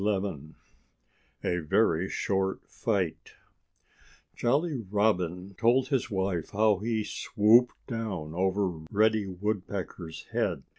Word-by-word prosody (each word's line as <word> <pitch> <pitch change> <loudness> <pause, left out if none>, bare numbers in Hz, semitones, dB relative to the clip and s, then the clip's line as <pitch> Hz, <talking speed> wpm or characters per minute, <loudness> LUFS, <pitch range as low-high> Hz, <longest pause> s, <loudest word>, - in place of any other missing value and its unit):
*XI* 95 -7 -2 0.9
*A 90 - 0
VERY 85 +2 +2
SHORT 95 -1 -1
FIGHT* 95 -3 -2 1.0
Jolly 140 +4 +1
Robin 95 -3 0
told 125 +3 +3
his 135 -4 0
wife 95 -4 -1
how 105 -1 +3
he 110 0 -1
swooped 115 +4 +3
down 100 -10 -4
over 95 +3 +1 0.2
Reddy 110 0 +2
Woodpecker's 95 -3 -4
head. - - -1
100 Hz, 100 wpm, -29 LUFS, 90-110 Hz, 1.0 s, told